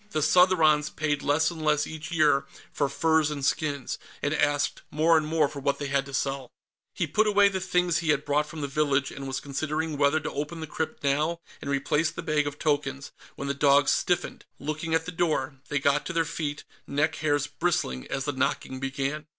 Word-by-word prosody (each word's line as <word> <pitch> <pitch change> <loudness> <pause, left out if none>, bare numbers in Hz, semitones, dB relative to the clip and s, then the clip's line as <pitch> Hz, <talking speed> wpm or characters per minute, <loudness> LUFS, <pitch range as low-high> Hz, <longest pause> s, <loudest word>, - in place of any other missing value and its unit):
The 155 -7 -1
Southrons 160 -5 +4
paid 150 -2 -1
less 155 +3 +2
and 160 -2 -7
less, 150 -1 +2
each 160 +2 -7
year, 150 -4 +3 0.3
for 140 -2 0
furs 160 +1 +2
and 145 -3 -3
skins, 145 -3 -1 0.2
and 145 - +1
asked 145 -1 +1
more 160 +2 +3
and 155 -1 +2
more 155 -1 +2
for 140 - -8
what 140 0 0
they 145 - -4
had 140 0 0
to 140 - -10
sell. 135 -2 -2 0.5
He - - 0
put 215 0 +2
away 205 -1 +5
the 190 -1 -2
things 180 -2 +1
he 165 -2 -3
had 150 -1 +2
brought 150 +1 +1
from 155 0 -7
the 140 - -1
village, 140 -1 +1
and 135 0 -7
was 130 - -2
considering 155 +2 -3
whether 145 +2 +4
to 155 - -5
open 150 +3 -4
the 160 - -4
crypt 160 0 -4
now 150 +4 +1 0.2
and 140 - -5
replace 150 +3 +1
the - - -7
bag 150 -3 +1
of 145 0 -5
tokens, 145 -3 -1 0.2
when 140 - -5
the 140 - 0
dogs 140 0 +4
stiffened, - - -1
looking 155 +3 -2
at 160 0 0
the 180 - -5
door. 150 -5 -1
They 145 - 0
got 140 +1 +2
to 185 - -4
their 165 -1 +1
feet, 150 -2 -4 0.2
neck 150 +2 0
hairs 145 -2 +1
bristling, 145 - -1
as 135 0 -3
the 145 - 0
knocking 130 -1 -2
began. 135 +3 -3
150 Hz, 215 wpm, -27 LUFS, 140-160 Hz, 0.5 s, away